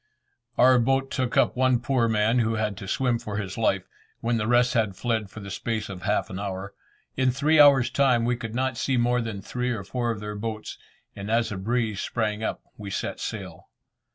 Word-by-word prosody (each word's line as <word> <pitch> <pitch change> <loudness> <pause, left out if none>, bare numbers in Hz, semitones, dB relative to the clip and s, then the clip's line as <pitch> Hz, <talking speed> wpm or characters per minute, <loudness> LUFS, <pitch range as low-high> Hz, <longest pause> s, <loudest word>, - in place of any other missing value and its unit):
Our 130 0 +6
boat 135 +3 +1
took 130 -2 -1
up - - +3
one 130 -1 +3
poor 120 -1 +1
man 110 +2 +2
who 115 -1 +1
had 110 -2 -1
to 100 - -8
swim 120 +2 +1
for 105 -2 -5
his 100 -3 -4
life, - - 0 0.3
when 115 0 0
the 105 -1 -1
rest 120 +1 +3
had 110 -5 +1
fled 110 -2 -1
for 110 - -10
the 100 0 -8
space 110 0 -3
of 95 -2 -7
half - - 0
an 95 - -5
hour. 100 0 -5 0.4
In 130 -1 +2
three 150 +5 +3
hours' 135 -4 +7
time, 125 -4 +3
we 120 +1 +1
could 115 -1 -6
not 130 -1 -1
see 130 +2 +1
more 120 +1 +2
than 110 -4 -5
three 125 0 -2
or 110 -5 -2
four 120 +4 -2
of 115 -3 -2
their 105 0 -5
boats, 110 +1 -5 0.4
and 100 +1 -6
as 115 0 +1
a - - -3
breeze 110 +1 -1
sprang 110 -2 -2
up - - -3 0.2
we 100 -1 -6
set - - -3
sail. - - -6
115 Hz, 215 wpm, -26 LUFS, 105-125 Hz, 0.4 s, hours